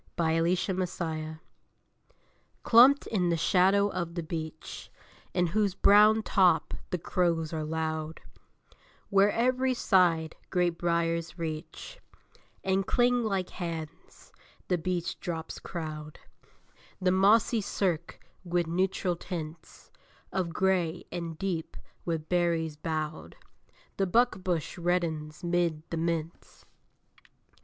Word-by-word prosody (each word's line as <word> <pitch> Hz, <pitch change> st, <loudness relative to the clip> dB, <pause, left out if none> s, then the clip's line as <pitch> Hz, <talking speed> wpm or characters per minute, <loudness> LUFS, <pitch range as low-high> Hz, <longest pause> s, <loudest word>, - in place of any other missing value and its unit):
LATE 165 Hz, +1 st, +2 dB
OCTOBER 190 Hz, -1 st, -1 dB
WOODS 160 Hz, -2 st, -4 dB, 1.2 s
Clumped 255 Hz, +4 st, +7 dB
in 180 Hz, -5 st, 0 dB
the 170 Hz, -, +1 dB
shadow 190 Hz, +4 st, +3 dB
of 170 Hz, -3 st, -4 dB
the 170 Hz, -, -2 dB
beech, 160 Hz, -1 st, -6 dB, 0.5 s
In 180 Hz, -1 st, +3 dB
whose 200 Hz, +2 st, 0 dB
brown 210 Hz, +2 st, +6 dB
top 180 Hz, -7 st, +3 dB, 0.2 s
the 180 Hz, -, -1 dB
crows 165 Hz, -2 st, 0 dB
are 155 Hz, -1 st, -2 dB
loud, 160 Hz, 0 st, -3 dB, 0.9 s
Where, 200 Hz, 0 st, +4 dB
every 255 Hz, +3 st, +1 dB
side, 170 Hz, -7 st, +2 dB
great 175 Hz, -2 st, 0 dB
briers 170 Hz, 0 st, 0 dB
reach 160 Hz, -1 st, -6 dB, 0.6 s
And 190 Hz, 0 st, +1 dB
cling 245 Hz, 0 st, +3 dB
like 195 Hz, -4 st, -1 dB
hands, 165 Hz, -3 st, -7 dB, 0.4 s
the 180 Hz, -2 st, +1 dB
beech 175 Hz, 0 st, -2 dB
drops 165 Hz, -3 st, -5 dB
crowd 155 Hz, -2 st, -6 dB, 0.8 s
The 185 Hz, -1 st, +2 dB
mossy 210 Hz, +4 st, +4 dB
cirque 180 Hz, -4 st, -2 dB, 0.2 s
with 175 Hz, -1 st, 0 dB
neutral 180 Hz, +1 st, 0 dB
tints 165 Hz, -2 st, -8 dB, 0.4 s
Of 185 Hz, -3 st, 0 dB
gray; 180 Hz, -1 st, 0 dB
and 170 Hz, -2 st, -5 dB
deep, 180 Hz, -4 st, -3 dB, 0.3 s
with 160 Hz, -2 st, -2 dB
berries 170 Hz, -3 st, 0 dB
bowed, 155 Hz, 0 st, -4 dB, 0.6 s
The 195 Hz, -, +1 dB
buckbush 185 Hz, -6 st, 0 dB
reddens 160 Hz, -3 st, -1 dB
'mid 170 Hz, -3 st, 0 dB
the 165 Hz, -, -2 dB
mints. 165 Hz, 0 st, -4 dB
175 Hz, 110 wpm, -29 LUFS, 160-190 Hz, 1.2 s, Clumped